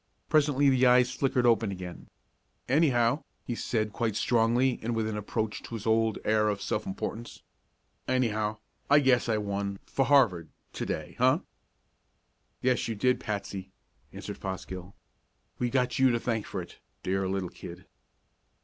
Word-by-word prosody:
Presently 145 -2 +3
the 130 -1 +4
eyes 125 0 +5
flickered 125 -1 +1
open 115 -3 +3
again. 90 -2 -8 0.6
"Anyhow," 130 -2 +3 0.2
he 120 - -3
said 110 -2 -1
quite 115 -4 -1
strongly 120 +3 +2
and 115 +1 -2
with 110 -1 0
an 110 - -3
approach 105 +1 -3
to 115 - -7
his 110 - -7
old 110 0 +2
air 110 0 +3
of 100 -1 -1
self 105 +2 -2
importance, 110 +4 -5 0.6
"anyhow 110 -4 0 0.3
I 145 - +7
guess 130 -4 +3
I 110 - +2
won 100 -1 -2
for 135 - 0
Harvard 115 - +3 0.2
to - - -4
day. - - -4
Huh?" - - +4 1.2
"Yes, 125 -1 +2
you 115 - -2
did, 125 +5 +2
Patsy," 100 -3 -5 0.4
answered - - -7
Fosgill. 95 0 -6 0.6
"We've 120 -1 0
got 125 -1 +1
you 130 0 +6
to 120 -1 +1
thank 115 -3 -2
for - - -4
it, - - -15 0.2
dear 95 0 0
little 95 -2 -2
kid." 90 +1 -10
115 Hz, 155 wpm, -29 LUFS, 100-125 Hz, 1.2 s, I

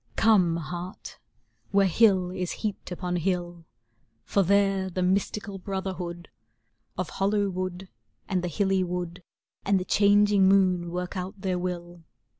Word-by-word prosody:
Come, 195 -6 +4
heart, 175 +3 -7 0.5
whei'e 200 0 +4
hill 185 -1 +3
is 185 -1 -3
heaped 205 -3 -4
upon 180 0 -2
hill, 175 -1 -2 0.6
For 200 - +1
there 195 0 +2
the 185 0 -2
mystical 195 +2 -1
brotherhood 185 -3 -5 0.7
Of - - -3
hollow 200 0 +2
wood 185 0 -4 0.4
and 185 -3 -1
the - - -1
hilly 190 +2 +1
wood 180 -1 -4 0.4
And 195 -1 +2
the 180 - -4
changing 205 -1 +4
moon 185 -3 +3
work 180 +2 -4
out 185 +2 -5
their 185 -2 -1
will. 175 -1 -5
185 Hz, 135 wpm, -27 LUFS, 180-195 Hz, 0.7 s, Come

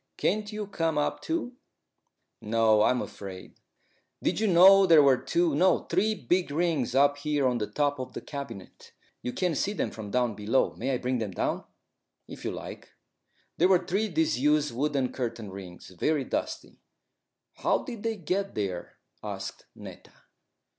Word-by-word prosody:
Can't 210 0 0
you 210 0 -4
come 165 -5 -1
up 145 - -1
too?" 310 -7 -3 0.8
"No; 110 -1 +3
I'm 125 +3 +2
afraid." 100 -3 -9 0.7
"Did - - 0
you 220 - +1
know 190 +2 +7
there 160 -4 +7
were 135 -2 +5
two 340 -2 +1
no, 185 -6 +3
three 215 +3 +2
big 175 - 0
rings 150 -5 0
up 145 +1 +4
here 145 -2 0
on 125 -1 0
the 105 - -2
top 145 +5 0
of 130 - -6
the - - -6
cabinet? 120 -9 -9 0.3
You 125 - -3
can't 180 +3 -1
see 200 +9 0
them - - -2
from 110 -2 -8
down 120 +1 +1
below. 105 +5 +1
May 130 - -3
I - - 0
bring 125 0 -1
them 110 -2 -2
down?" 95 - -2 0.6
"If - - -10
you - - -1
like." - - -8 0.7
They 175 - +5
were 185 -2 +3
three 200 +4 0
disused 150 -3 +1
wooden 135 0 0
curtain 115 -5 -4
rings, 95 -2 -10
very 140 - 0
dusty. - - -4 0.8
"How - - +1
did 235 -6 -7
they 225 0 -1
get 195 +2 -2
there?" 95 -4 -4 0.3
asked - - -6
Netta. - - -12
145 Hz, 165 wpm, -28 LUFS, 115-185 Hz, 0.8 s, know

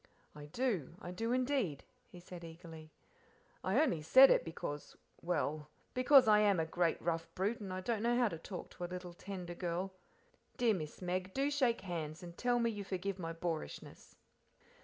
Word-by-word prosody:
"I 150 -1 -9
do, 200 - -1
I 175 - -7
do 225 +6 -2
indeed," 250 - 0 0.3
he 180 - -12
said 175 0 -10
eagerly; 160 -1 -10 0.7
"I 190 +8 +2
only 255 - +2
said 260 - +8
it - - +4
because 150 -3 -6 0.2
well, 155 -3 -1 0.2
because 255 0 +6
I 210 -1 +7
am 205 -4 +4
a 160 - +1
great 170 +1 +1
rough 165 -1 -2
brute, 205 +5 0
and 185 -3 -5
don't 225 0 -1
know 240 +1 +2
how 245 -3 +3
to 165 - -6
talk 180 +2 -7
to 180 - -8
a 175 - -3
little, 180 -1 -6
tender 180 -1 -6
girl. 180 +2 -3 0.6
Dear 235 -3 +3
Miss 155 -1 -5
Meg, 185 +1 -2
do 275 +2 +1
shake 255 -5 +2
hands 165 -2 -5
and 170 -1 -9
tell 245 +3 +1
me 235 -1 +2
you 205 -2 -5
forgive 195 0 -3
my 165 -2 -3
boorishness." 165 -1 -5
180 Hz, 180 wpm, -35 LUFS, 165-225 Hz, 0.7 s, said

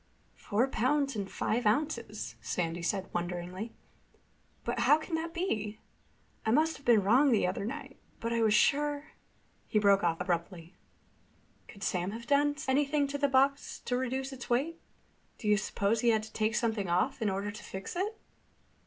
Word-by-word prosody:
"Four 225 +6 0
pounds 275 +2 +1
and 200 -2 -3
five 230 0 0
ounces," 235 -3 -1
Sandy 170 -1 -2
said 190 +2 -2
wonderingly. 180 +5 -3 0.9
"But 235 0 -2
how 260 +6 +6
can 315 +2 -8
that 325 +1 -1
be? 220 - -2 0.7
I - - -1
must 310 +7 +3
have 280 - -17
been 225 -4 +6
wrong 255 +8 +5
the 220 - +3
other 185 +2 -2
night. 275 +3 -6 0.2
But 230 0 -2
I 230 - +1
was 220 -1 +4
sure—" 290 +4 +2 0.6
He - - 0
broke 200 -1 +4
off 165 -1 +1
abruptly. 175 -1 -3 0.9
"Could 200 -2 -11
Sam 180 -2 0
have 230 +1 -7
done 290 +2 +3
anything 285 +2 +2
to 285 0 -3
the 285 - +3
box 275 +1 +2
to 245 - -2
reduce 260 +2 -2
its 260 - -9
weight? 285 +8 0 0.6
Do 215 - -5
you 210 - +5
suppose 205 +2 0
he 240 - +4
had 220 -1 +3
to 220 - -11
take 215 0 0
something 220 -6 0
off 205 +10 +1
in 215 - +2
order 195 +2 -2
to 210 - -10
fix 190 - -7
it?" 420 +5 -2
230 Hz, 175 wpm, -31 LUFS, 200-280 Hz, 0.9 s, how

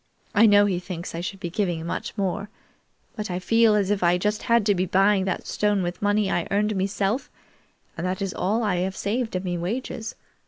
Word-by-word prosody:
I 220 +1 +6
know 205 -1 +6
he 190 -3 0
thinks 180 -1 -6
I 165 - -4
should 190 +2 -5
be 175 - -5
giving 175 -5 -1
much 170 - -4
more, 200 +1 -2 0.7
but 210 -2 -4
I 180 - -2
feel 225 +3 +4
as 205 -1 +1
if 205 - 0
I 175 0 +4
just 210 +4 -1
had 235 -2 +2
to 205 - +4
be 185 0 0
buying 195 +1 +3
that 185 - -2
stone 205 -2 +1
with 175 +1 -4
money 205 -1 +2
I 175 - 0
earned 210 +1 +1
meself; 195 +5 -1 0.7
and 170 +2 -3
that 185 +1 -2
is 195 -2 -2
all 215 +5 0
I 205 -4 +1
have 185 +2 -2
saved 225 +1 -2
of 185 +1 -2
me 175 -1 -2
wages. 220 +4 -4
195 Hz, 220 wpm, -24 LUFS, 180-210 Hz, 0.7 s, I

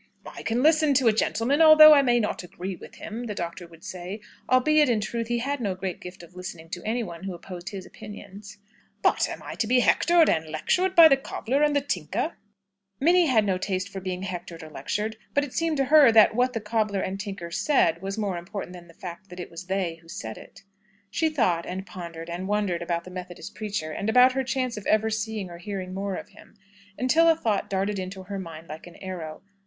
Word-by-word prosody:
"I - - -9
can 235 +3 0
listen 310 -2 +4
to 260 -3 +3
a - - +2
gentleman, 235 +6 +1
although 310 -1 +10
I 285 - +6
may 240 -3 +3
not 210 - -2
agree 180 +2 -6
with - - -13
him," 230 +3 -6
the 210 - -4
Doctor 170 0 -5
would 165 -1 -17
say 185 +3 -6 0.3
(albeit, 295 +3 +4
in 230 -3 +2
truth, 230 +2 -3
he 240 0 0
had 275 +3 -2
no 200 -4 -1
great 185 -1 -5
gift 180 0 -10
of 170 +1 -16
listening 175 -3 -8
to 175 - -5
anyone 210 -6 -3
who 190 -2 -4
opposed 175 +1 -8
his 195 -2 -7
opinions), 205 -1 -11 0.5
"but - - +3
am - - -7
I - - -6
to 220 - -2
be 250 +2 +4
hectored 340 +5 +4
and 160 0 +1
lectured 365 - 0
by 335 -1 +10
the 275 -3 +4
cobbler 270 0 -2
and 295 -1 +3
the 285 - +3
tinker?" 230 - -2 0.7
Minnie 345 +4 +4
had 225 -6 +3
no 190 -2 0
taste 185 0 -2
for 195 - -6
being 185 0 -4
hectored 175 -3 -6
or 155 - -11
lectured; 210 +7 -3 0.2
but 285 - +3
it 285 - -7
seemed 330 -2 0
to 275 - +2
her 285 -3 +7
that 220 -2 +6
what 250 +2 +1
the 225 - -3
cobbler 210 -2 0
and 190 +1 -3
tinker 195 -4 -6
said, 170 - +2
was 195 +2 -4
more 200 -5 -2
important 180 +1 -7
than 175 -1 -12
the 170 - -18
fact 185 +2 -9
that 180 - -10
it 175 - -7
was 170 +2 -9
they 185 -4 -2
who 165 - -21
said 110 -9 -6
it. - - -14 0.5
She 320 +8 +1
thought, 185 - 0
and 190 +1 -5
pondered, 170 -3 -8
and 175 +2 -5
wondered 205 -4 0
about 170 0 -2
the 185 - -11
Methodist 180 -1 -8
preacher, 205 -7 -4
and 200 +7 -3
about 250 +3 +6
her 265 +1 -1
chance 255 -2 -2
of 210 - -7
ever 220 +1 +2
seeing 215 -3 -3
or 170 - -10
hearing 185 0 -5
more 195 0 -3
of - - -8
him, - - -18 0.4
until 320 +7 +4
a 325 - +5
thought 220 -9 -1
darted 195 +1 -1
into 190 +1 -6
her 195 +1 -5
mind 165 -2 -9
like 155 +3 -9
an 175 - -13
arrow. 175 -4 -7
200 Hz, 230 wpm, -26 LUFS, 180-245 Hz, 0.7 s, although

